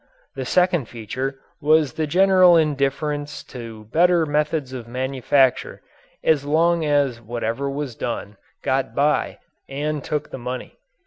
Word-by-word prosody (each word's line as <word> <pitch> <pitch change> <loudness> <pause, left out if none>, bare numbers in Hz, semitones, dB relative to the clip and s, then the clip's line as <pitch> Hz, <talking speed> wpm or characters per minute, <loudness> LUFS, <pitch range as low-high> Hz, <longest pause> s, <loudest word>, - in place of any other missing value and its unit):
The 135 -1 -5
second 180 -2 +2
feature 130 +4 -4 0.2
was 155 -1 +3
the 155 -1 -2
general 185 +1 +6
indifference 145 -1 -1
to 115 -3 -8
better 175 0 +4
methods 150 -2 -1
of 120 -3 -7
manufacture 130 +1 +1 0.4
as 150 -3 +3
long 165 +3 +2
as 140 -5 +1
whatever 120 +4 -3
was 140 -2 -4
done 105 -4 -5 0.3
got 130 -3 -1
by 145 +2 +1 0.3
and 145 +1 -3
took 150 -1 -3
the - - -6
money. 125 - -6
140 Hz, 130 wpm, -22 LUFS, 130-155 Hz, 0.4 s, general